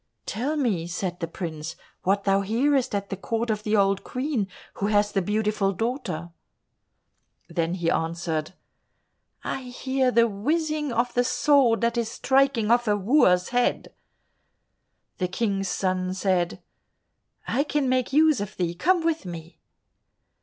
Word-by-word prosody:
"Tell 275 +9 -2
me," 205 - 0
said 180 +1 -3
the 165 - -2
prince, 160 -2 -6 0.3
"what 195 +2 +1
thou 195 0 +3
hearest 250 +4 +1
at 200 0 -3
the - - -1
court 230 +4 -2
of 210 -1 -2
the 215 0 0
old 195 0 +2
Queen 255 -5 -2 0.3
who 200 - 0
has 205 0 +2
the 195 - +1
beautiful 210 0 0
daughter." 190 - -3 1.2
Then 170 0 -1
he 170 -2 0
answered, 165 0 -2 0.9
"I - - -3
hear 260 +1 -1
the 235 -1 +4
whizzing 300 +7 -1
of 240 +1 0
the 245 - +3
sword 250 -2 +3
that 235 0 +1
is 230 -1 -1
striking 265 -4 +2
off 240 0 +3
a 205 -1 +3
wooer's 190 -5 +3
head." 245 0 0 1.3
The 180 - +1
King's 195 0 -1
son 185 0 -1
said, 185 -2 0 0.8
"I 270 +5 +1
can 295 -2 0
make 255 0 +1
use 305 -3 +4
of 205 +1 -6
thee, 175 -2 -1
come 340 - +1
with 325 - 0
me." 170 -1 -9
210 Hz, 145 wpm, -25 LUFS, 185-255 Hz, 1.3 s, the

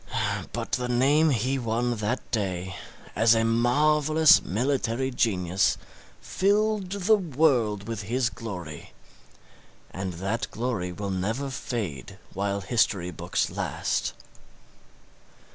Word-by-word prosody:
But - - -5
the 125 -1 -1
name 140 +6 +4
he 130 +1 0
won 120 0 -1
that 110 +4 -3
day 95 -3 -2 0.4
as 115 +1 +5
a 115 - +2
marvellous 150 +7 +4
military 130 +3 -1
genius 95 -5 +1 0.4
filled 205 0 +1
the 200 +2 +3
world 130 - +1
with 115 -2 -4
his 120 +4 0
glory, 90 -9 -8 1.0
and 95 0 -4
that 100 +8 -3
glory 110 -6 -2
will 100 +2 -4
never 110 +9 -2
fade 105 - -5 0.2
while 100 +1 -1
history 95 -4 +1
books 80 - -2
last. - - -2
115 Hz, 110 wpm, -26 LUFS, 100-135 Hz, 1.0 s, as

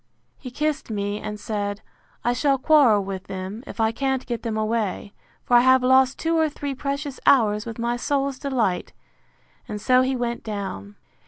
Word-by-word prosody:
—He 255 - -7
kissed 300 +2 -2
me, 205 -1 -2
and 210 0 -5
said, 205 -1 -3 0.4
I 240 - +2
shall 275 +2 +2
quarrel 260 -7 +4
with 190 -1 -6
them, 190 +5 -6
if - - -9
I 220 0 +3
can't 265 +1 -1
get 235 -2 -4
them 225 -2 -3
away; 215 -2 -2 0.3
for 245 - +2
I - - +9
have 260 +1 +5
lost 260 +1 +4
two 330 0 0
or 315 -1 +3
three 285 -1 -5
precious 280 +1 -4
hours 210 -5 +4
with 230 - -6
my 235 +1 -1
soul's 275 0 -1
delight: 240 -10 -1 0.7
And 210 - -5
so 255 +4 +4
he 260 +1 0
went 240 -1 -3
down. 195 - -5
240 Hz, 180 wpm, -23 LUFS, 210-270 Hz, 0.7 s, I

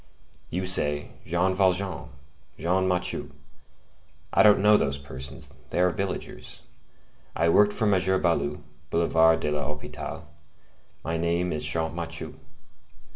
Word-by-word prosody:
You 90 +1 -2
say, 75 -5 +2 0.2
Jean 90 +3 +1
Valjean, 95 0 0 0.5
Jean 90 +4 +1
Mathieu! 90 -1 -1 1.0
I - - +5
don't 105 -1 +6
know 105 0 +7
those 70 -8 +1
persons; 65 -1 -6 0.2
they - - -2
are 90 0 +4
villagers. 65 -9 -5 0.7
I 85 +1 +2
worked 105 +4 +5
for 110 - -1
M. 100 -3 +3 0.2
Baloup, 75 -4 0 0.3
Boulevard 80 0 +3
de 75 - -1
l'Hôpital; 75 0 -5 0.8
my 80 +1 -2
name 85 +2 0
is 75 -1 -3
Champmathieu. 80 +2 -2
85 Hz, 120 wpm, -26 LUFS, 75-95 Hz, 1.0 s, know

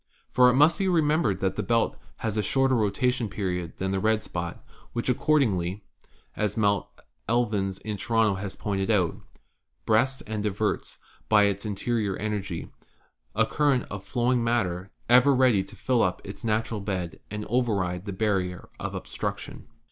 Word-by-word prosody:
For 125 0 +6
it 125 - +2
must 155 +7 +5
be 195 - +1
remembered 155 - +2
that 95 0 0
the - - +1
belt 115 -1 +1 0.3
has 110 -2 -1
a 105 - +2
shorter 135 +6 +2
rotation 115 +2 +1
period! 90 -4 -3
than 95 0 -2
the 95 - 0
red 110 +1 +2
spot, 85 -4 -6 0.3
which, 120 +2 -2
accordingly 105 - +1 0.5
(as 105 -1 -1
Mr. 100 -3 +2 0.4
Elvins 105 -5 +1
of 105 -2 -3
Toronto 115 -1 +2
has 95 0 -5
pointed 100 0 -2
out), 95 -7 +2 0.7
breasts 130 +5 +2
and 110 0 -4
diverts, 105 +1 -1 0.3
by 105 -1 +6
its 100 +1 0
in 105 - -2
terior 105 -2 -1
energy, 100 -5 -4 0.6
a 110 +2 +4
current 140 +1 +1
of 100 -1 -5
flowing 120 +2 +1
matter, 95 -6 0 0.2
ever 125 +3 +6
ready 125 -7 +4
to - - -12
fill 125 -3 +1
up 90 - +1
its 100 +4 -8
natural 110 0 0
bed 95 -4 -4
and 105 0 -5
override 100 -7 0
the 100 - -4
barrier 95 -3 -1
of - - -4
obstruc - - -3
tion." - - -10
105 Hz, 165 wpm, -26 LUFS, 95-120 Hz, 0.7 s, For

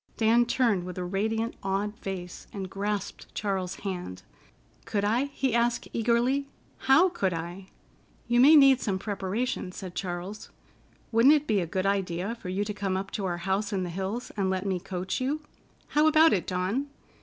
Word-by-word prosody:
Dan 235 +2 +4
turned 225 -8 +2
with 180 0 -7
a 180 - -2
radiant, 220 +5 -1
awed 195 +2 -1
face, 180 -2 -6
and 190 -2 -6
grasped 205 0 -4
Charles's 190 -3 -2
hand. 180 - -5 0.6
"Could 210 -3 -1
I?" 235 +6 +2
he 275 -3 -2
asked 235 0 +1
eagerly. 240 +4 +1 0.4
"How 335 +8 +7
could 190 - -1
I?" 175 +3 -6 0.6
"You 240 0 +3
may 290 +5 +8
need 275 -3 +7
some 195 -3 0
preparation," 200 +2 -3
said 185 -1 -8
Charles. 180 +3 -5 0.6
"Wouldn't 240 +6 +6
it 300 -1 0
be 215 -6 +2
a 175 - -2
good 185 +3 -2
idea 195 0 0
for 220 -6 -8
you 190 +3 0
to 210 - -3
come 195 -2 -1
up 195 +1 -5
to 200 - -3
our 175 -2 -1
house 195 +3 0
in 190 -2 -1
the 175 - -4
hills 195 +7 -4
and 195 -2 0
let 190 +1 -1
me 190 -2 0
coach 185 +3 -4
you? 285 +4 -1 0.5
How 300 +1 +4
about 315 +1 +6
it, 185 - 0
Dawn? 190 +10 -1
200 Hz, 180 wpm, -28 LUFS, 185-240 Hz, 0.6 s, may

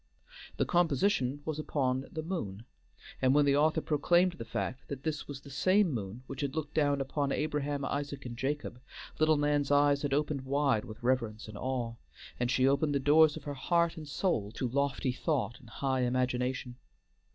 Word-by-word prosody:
The - - +2
composition 145 -4 +1
was 155 -1 -3
upon 135 -3 -1
The 155 - -4
Moon, 115 - -4 0.6
and 130 +1 +4
when 145 -1 +5
the 140 -1 +4
author 155 +2 +3
proclaimed 175 +5 +3
the 115 -10 -8
fact 130 +3 -4
that 140 -1 -6
this 155 -2 -3
was 145 -1 -7
the 140 - -12
same 185 +7 +3
moon 110 0 -5
which 135 +2 -6
had 140 0 -2
looked 155 -2 -3
down 145 -2 +2
upon 140 +1 -1
Abraham, 145 -2 -1
Isaac, 140 -1 -3
and 120 -1 -5
Jacob, 135 -1 -3 0.4
little 155 0 +4
Nan's 145 -1 +1
eyes 145 0 +4
had 145 - -2
opened 145 0 0
wide 135 -4 +1
with 110 -1 -10
reverence 115 -4 0
and 110 - -9
awe, 120 0 -2 0.5
and 120 0 0
she 130 0 +3
opened 145 +1 +2
the - - +2
doors 150 +2 +5
of - - -9
her 145 - -4
heart 170 +5 +1
and 155 -3 -8
soul 140 - -1
to 125 - -2
lofty 140 +1 0
thought 125 - -1
and 125 -4 -16
high 130 +2 -1
imagination. 125 0 -1
140 Hz, 185 wpm, -31 LUFS, 125-150 Hz, 0.6 s, when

